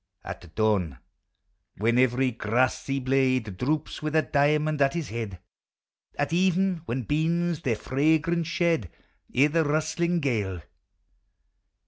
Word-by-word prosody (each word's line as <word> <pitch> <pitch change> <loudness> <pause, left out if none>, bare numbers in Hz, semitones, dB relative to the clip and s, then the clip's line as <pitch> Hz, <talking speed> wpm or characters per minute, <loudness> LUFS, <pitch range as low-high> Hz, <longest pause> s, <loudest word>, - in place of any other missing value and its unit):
At 85 -1 -9
dawn, 100 - +1 0.8
when 115 +4 +2
every 130 +1 +2
grassy 125 +4 0
blade 130 -5 +1
Droops 150 +9 -2
with 155 0 -3
a 155 - +4
diamond 150 +1 +1
at 135 +2 +3
his 165 -5 -3
head. 110 -4 -5 0.8
At 145 +2 -1
even, 185 +1 +2
when 125 +1 -2
beans 165 - 0
their 125 -8 0
fragrance 160 - +1
shed, 170 - 0 0.5
I' 135 - +7
the 160 +2 +2
rustling 155 +3 0
gale. 105 - -2
140 Hz, 120 wpm, -26 LUFS, 115-160 Hz, 0.8 s, I